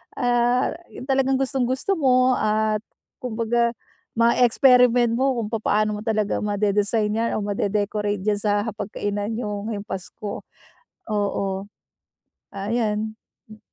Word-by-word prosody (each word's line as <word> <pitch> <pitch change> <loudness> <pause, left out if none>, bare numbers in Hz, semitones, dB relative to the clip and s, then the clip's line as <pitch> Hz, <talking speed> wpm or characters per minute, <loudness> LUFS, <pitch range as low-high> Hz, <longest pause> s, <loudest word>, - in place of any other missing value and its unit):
ah, 245 0 +2 0.2
yung - - -8
talagang 270 0 +2
gustong 265 -2 0
gusto 265 +10 -1
mo 255 -2 +4
at 215 0 +1 0.4
kumbaga 235 0 0 0.4
ma-experiment 240 0 +4
mo 260 -1 +1
kung 220 - -2
papaano 215 -1 0
mo - - -7
talaga 215 -2 0
ma-de-design 210 +1 +1
yan 230 +1 0
o 205 - -3
ma-de-decorate 205 0 -1
diyan 210 -1 +1
sa 205 0 +1
hapagkainan 205 +1 -3
yung 210 -2 -4
ngayong 205 -1 -5
Pasko, 200 +2 -6 0.7
oo. 205 -1 0 1.1
Ayan, 215 +1 -1 0.3
hmm. 215 0 -14
220 Hz, 120 wpm, -23 LUFS, 210-245 Hz, 1.1 s, mo